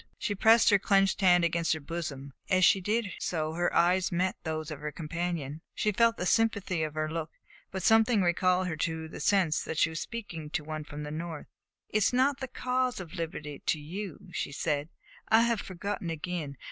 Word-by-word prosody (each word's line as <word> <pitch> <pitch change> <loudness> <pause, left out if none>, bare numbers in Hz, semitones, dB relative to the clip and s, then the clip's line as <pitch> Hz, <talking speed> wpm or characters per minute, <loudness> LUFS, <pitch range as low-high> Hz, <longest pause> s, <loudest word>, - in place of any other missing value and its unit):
She 205 - -2
pressed 225 +3 +5
her 200 - +5
clenched 195 0 +2
hand 180 -2 +5
against 170 -1 +1
her 160 - -3
bosom, 140 -3 -5 0.2
and 185 - +4
as 185 - +5
she 195 - +5
did 210 +1 0
so 155 -2 -2
her 175 +1 0
eyes 180 +3 +3
met 180 +2 0
those 155 -1 -3
of 150 - -6
her 150 +1 -4
companion. 165 -2 -4
She 210 - +1
felt 230 +2 +3
the 180 - -2
sympathy 205 -5 +1
of 155 -1 -3
his 155 0 -1
look, 160 -1 -3 0.4
but 190 -1 -5
something 225 -2 +4
recalled 180 +1 +2
her 175 -3 -2
to 160 0 -2
the 160 - -9
sense 180 -2 +2
that 160 - -5
she 165 - +3
was 160 - -4
speaking 180 -10 -6
to 150 - -2
one 155 0 -5
from 150 0 -7
the 150 - -6
North. 160 0 -5 0.4
"It - - +1
is 215 +3 +2
not 265 +2 +3
the 265 - -4
cause 255 -1 -1
of 175 -4 -8
liberty 155 -4 -5
to 155 - 0
you," 190 +5 -7
she - - -3
said. 145 +1 -1 0.4
"I 225 +1 +6
have 235 -3 +1
forgotten 190 -1 -4
again. 165 -3 -4
175 Hz, 210 wpm, -29 LUFS, 155-200 Hz, 0.4 s, I